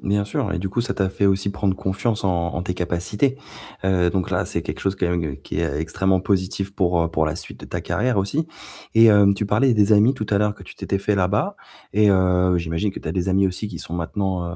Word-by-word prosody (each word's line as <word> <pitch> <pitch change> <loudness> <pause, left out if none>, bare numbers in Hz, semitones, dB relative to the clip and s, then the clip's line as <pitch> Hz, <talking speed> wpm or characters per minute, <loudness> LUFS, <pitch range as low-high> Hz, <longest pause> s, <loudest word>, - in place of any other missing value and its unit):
Bien 100 +1 0
sûr, 100 0 -2
et 95 - -2
du 95 - -3
coup, 100 +5 -1
ça 120 - -2
t'a 95 -1 0
fait 100 +1 0
aussi 100 +1 +1
prendre 95 -1 -1
confiance 100 +4 -2
en 85 -2 0
en 85 - -2
tes 90 - -2
capacités. 90 +10 -1 0.5
Heu, 90 -2 +2
donc 95 -1 -2
là, - - +1
c'est - - -3
quelque - - -6
chose 95 0 -1
quand 90 - 0
même, 85 -5 -2
qui - - -4
est 70 +1 -1
extrêmement 95 +3 +1
positif 95 +1 -1
pour 90 -3 +1
heu, - - -1
pour 80 -1 0
la 75 +1 -2
suite - - -8
de - - -9
ta - - -4
carrière 125 -2 0
aussi. 140 +12 -1 0.5
Et 115 0 +8
heu, 100 -1 +6
tu 105 - -2
parlais 120 +5 +3
des 105 0 +4
amis 105 +5 +5
tout 110 -6 -5
à 100 - +3
l'heure, 105 0 +1
que 95 - -13
tu - - -12
t'étais 100 - -2
fait 105 +2 0
là-bas, 100 - 0 0.4
et 105 0 +4
heu, 90 -1 +3
j'imagine 85 +5 -1
que - - -8
tu - - -7
as - - -1
des 90 0 -1
amis 95 +1 +3
aussi 95 +3 -4
qui - - -7
sont 85 - -6
maintenant 90 +2 -2
95 Hz, 255 wpm, -22 LUFS, 90-105 Hz, 0.5 s, Et